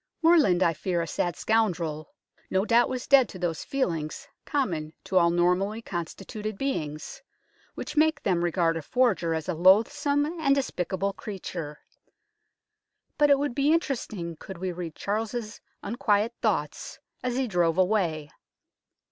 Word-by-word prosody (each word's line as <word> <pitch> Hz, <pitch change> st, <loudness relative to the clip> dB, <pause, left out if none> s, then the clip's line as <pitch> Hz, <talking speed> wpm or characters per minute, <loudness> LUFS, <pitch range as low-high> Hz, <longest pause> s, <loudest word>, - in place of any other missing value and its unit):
Morland, 300 Hz, -, +5 dB
I 165 Hz, -, +3 dB
fear 175 Hz, +1 st, -1 dB
a -, -, -3 dB
sad 175 Hz, +1 st, -2 dB
scoundrel, 170 Hz, -9 st, 0 dB, 0.4 s
no 190 Hz, +2 st, +1 dB
doubt 235 Hz, +1 st, +4 dB
was 255 Hz, -1 st, -4 dB
dead 265 Hz, -4 st, +5 dB
to -, -, -9 dB
those 175 Hz, -3 st, -2 dB
feelings 165 Hz, -, -2 dB, 0.2 s
common 170 Hz, -, -1 dB
to 185 Hz, -, +2 dB
all 170 Hz, -1 st, +4 dB
normally 180 Hz, +5 st, +1 dB
constituted 195 Hz, +4 st, -5 dB
beings, 265 Hz, -, -4 dB, 0.5 s
which -, -, -6 dB
make 310 Hz, -1 st, +3 dB
them 175 Hz, -3 st, +1 dB
regard 170 Hz, -1 st, +1 dB
a -, -, -4 dB
forger 190 Hz, -, +1 dB
as 160 Hz, -1 st, -4 dB
a 180 Hz, -, 0 dB
loathsome 215 Hz, -, +3 dB
and 310 Hz, -3 st, +1 dB
despicable 195 Hz, -7 st, -2 dB
creature; 175 Hz, -8 st, -7 dB, 1.4 s
but 295 Hz, -1 st, +5 dB
it 280 Hz, -, +6 dB
would 285 Hz, -2 st, -1 dB
be 280 Hz, +3 st, +2 dB
interesting 220 Hz, -, -1 dB
could 190 Hz, +2 st, -9 dB
we 185 Hz, +1 st, -3 dB
read 170 Hz, -2 st, -6 dB
Charles's 215 Hz, +2 st, -3 dB, 0.2 s
unquiet 215 Hz, 0 st, +1 dB
thoughts 190 Hz, -, -1 dB, 0.2 s
as 250 Hz, 0 st, -2 dB
he 265 Hz, -1 st, 0 dB
drove 175 Hz, -4 st, +1 dB
away. 180 Hz, -6 st, +1 dB
195 Hz, 145 wpm, -27 LUFS, 170-245 Hz, 1.4 s, it